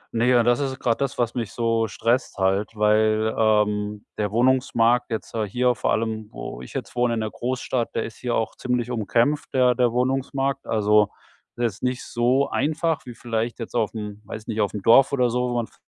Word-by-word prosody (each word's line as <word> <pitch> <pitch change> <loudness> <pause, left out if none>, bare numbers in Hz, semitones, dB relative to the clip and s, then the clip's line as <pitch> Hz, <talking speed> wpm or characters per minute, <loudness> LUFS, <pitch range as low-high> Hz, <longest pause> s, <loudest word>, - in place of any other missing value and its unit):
Ne, 125 +2 +3
und 115 - +2
das 120 +1 +3
ist 135 -2 -2
grad 115 +2 0
das, 140 -1 -1
was 120 -2 0
mich 115 -5 -3
so 115 -1 +1
stresst 120 +3 -1
halt, 95 +1 +1
weil, 110 +1 +2
ähm, 105 -1 +1
der 105 -1 0
Wohnungsmarkt 120 0 +2
jetzt, 110 - -5
äh, 110 -2 -1
hier 125 +3 +2
vor 110 - -1
allem, 110 -1 -2
wo - - -7
ich 65 - -11
jetzt - - -6
wohne 120 -1 +1
in - - -2
der 110 - -3
Großstadt 125 -1 -3
der - - 0
ist 115 - -9
hier 120 -1 -2
auch 110 0 -1
ziemlich 125 -1 -2
umkämpft, 120 +6 0
der 125 -1 +4
der 120 -1 +2
Wohnungsmarkt. 135 +2 -1
Also, 105 -1 +3 0.5
der 120 - 0
ist 110 -1 -3
nicht 125 0 -2
so 125 +4 +1
einfach 160 -1 -1
wie 120 - -8
vielleicht 115 0 -3
jetzt 115 - -7
auf'm 105 -3 -2
weiß 110 +1 -8
nicht, 110 -2 -2
auf'm 100 -1 -2
Dorf 135 +5 +6
oder 125 -3 +2
so, 125 0 0
wo 120 - -2
man 120 -1 0
v - - -24
115 Hz, 210 wpm, -23 LUFS, 110-125 Hz, 0.5 s, Dorf